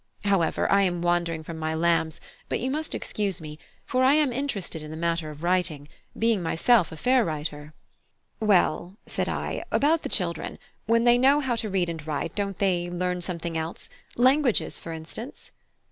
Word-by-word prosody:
However, 195 -5 +2
I 200 - +5
am 175 -3 0
wandering 170 -2 0
from 160 0 -7
my 160 0 -1
lambs; 165 -1 +1 0.3
but - - 0
you 260 +2 -1
must 310 +3 -2
excuse 200 -3 -2
me, 155 -1 -9 0.3
for 255 +1 +1
I 265 +3 +6
am 295 -5 +2
interested 230 - -3
in 155 - -8
this 160 +1 -7
matter 170 -2 -1
of 150 +1 -10
writing, 175 -5 0 0.3
being 225 -3 +2
myself 170 +3 +3
a 160 - -8
fair 250 +6 +3
writer." 150 -2 -5 0.6
"Well," 195 -2 +2
said - - -2
I, - - -3
"about 315 +3 +3
the - - -4
children; 170 -4 -1 0.3
when 230 +1 +3
they 240 0 +5
know 275 +3 +5
how 260 -4 0
to 220 -1 -2
read 185 -2 +1
and 165 -2 -5
write, 155 +2 -2
don't 200 -2 -2
they 180 -3 +1
learn 180 0 -2
something 170 -2 -3
else 160 +1 -4 0.3
languages, 260 0 +3
for 165 - -8
instance?" 165 - -7
180 Hz, 180 wpm, -26 LUFS, 160-230 Hz, 0.6 s, I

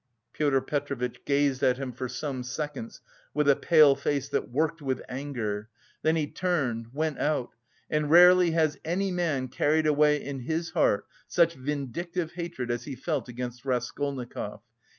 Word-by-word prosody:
Pyotr 140 -3 +2
Petrovitch 130 -4 -3
gazed 140 -2 +2
at 125 -2 +3
him 135 -1 -4
for 130 +1 -5
some 135 0 -4
seconds 135 -1 -5 0.3
with 150 -1 +2
a 140 - +6
pale 150 0 +6
face 140 0 -1
that - - -1
worked 155 +5 0
with 130 -2 -1
anger, 120 -6 -4 0.3
then 160 +1 +2
he 155 -2 +1
turned, 140 -10 -1
went 155 +2 -2
out, 150 -5 0 0.4
and 150 -1 0
rarely 180 +2 +7
has 160 -2 +1
any 185 +4 -1
man 160 -8 0
carried 150 +4 +1
away 150 0 +4
in 140 -1 -5
his 160 +6 -2
heart 100 - +2 0.2
such 170 -1 +3
vindictive 150 +5 -3
hatred 170 -9 -4
as 120 - -3
he 140 - -5
felt 135 -2 -3
against 120 0 -6
Raskolnikov. 130 0 -3
145 Hz, 155 wpm, -28 LUFS, 130-160 Hz, 0.4 s, rarely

